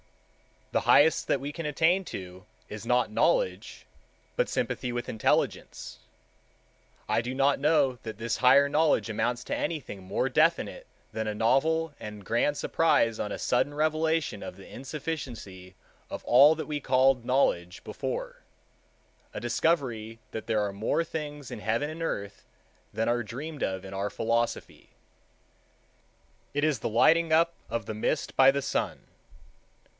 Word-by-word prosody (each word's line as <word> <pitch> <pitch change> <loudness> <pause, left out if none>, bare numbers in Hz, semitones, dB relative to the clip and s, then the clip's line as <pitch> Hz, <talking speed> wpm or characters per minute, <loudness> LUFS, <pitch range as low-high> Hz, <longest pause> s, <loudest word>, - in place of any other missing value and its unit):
The - - +1
highest 160 +2 +5
that 140 - +1
we 140 +1 -4
can 165 +1 -6
attain 165 +6 +2
to 95 - -8 0.2
is 105 +2 -8
not 125 -2 +2
Knowledge, - - 0 0.5
but - - +1
Sympathy 125 - -2
with 120 0 -4
Intelligence. 110 - -1 1.1
I - - +2
do 125 +2 -5
not 140 +1 +2
know 140 -4 +2
that 110 -3 -6
this 115 +1 -2
higher 135 +3 +6
knowledge 150 -4 +2
amounts 120 +3 -1
to - - -3
anything 145 - -4
more 95 - -1
definite - - +1 0.2
than 110 -1 -3
a 105 - -2
novel 160 +8 +2
and 105 -2 -8
grand 120 +7 +1
surprise 115 -9 +2
on 105 - -3
a - - -4
sudden 145 +4 0
revelation 155 -5 0
of - - -7
the 95 - -13
insufficiency 125 - -7 0.3
of - - -6
all 140 +6 +6
that 160 - -5
we 150 -1 -2
called 130 -2 +3
Knowledge 90 -9 0
before—a - - -9
discovery 120 -9 -1
that 110 - -6
there 110 -2 +1
are 100 -1 -2
more 110 +11 0
things 150 -4 -6
in - - -6
heaven 115 +7 -1
and 160 +1 -7
earth 100 -11 -4 0.5
than 110 - 0
are 120 0 +1
dreamed 140 +8 -7
of 95 0 -2
in 95 - -8
our 100 +1 -2
philosophy. 115 +3 -2 1.7
It 145 - 0
is 155 -5 +2
the - - -2
lighting 160 +9 +4
up 165 +1 +4 0.2
of 115 -3 -3
the 110 - -4
mist 110 +7 -2
by 135 0 +8
the 140 0 -2
sun. 140 - -2
130 Hz, 150 wpm, -28 LUFS, 110-155 Hz, 1.7 s, by